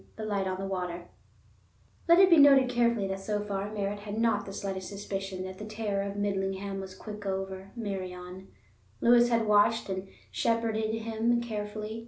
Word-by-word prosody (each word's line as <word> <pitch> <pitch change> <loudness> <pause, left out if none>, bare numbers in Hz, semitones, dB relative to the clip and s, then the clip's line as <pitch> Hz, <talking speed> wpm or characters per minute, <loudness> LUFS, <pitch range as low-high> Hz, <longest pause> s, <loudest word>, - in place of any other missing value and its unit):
The 220 - -5
Light 200 -2 -1
on 185 0 -2
the 195 - -3
Water 180 -2 -4 1.0
Let 340 0 +7
it 375 0 +7
be 335 - +8
noted 275 -3 +7
carefully 235 -4 +2
that 195 0 -3
so 205 +2 -2
far 205 0 -3
Merritt 205 -1 -2
had 205 +1 -6
not 225 -3 +1
the - - -6
slightest 190 -1 -4
suspicion 195 -2 -5
that 185 +1 -7
the - - -6
terror 215 -2 -2
of 200 0 -4
Midlingham 195 -1 -2
was 190 -1 -9
quick 210 0 -8
over 190 0 -4
Meirion. 185 -3 -6 0.5
Lewis 240 0 +5
had 230 -2 +2
watched 210 +1 +3
and 190 0 -3 0.2
shepherded 225 -1 0
him 225 +1 0
carefully. 215 -1 -5
205 Hz, 175 wpm, -29 LUFS, 195-225 Hz, 1.0 s, be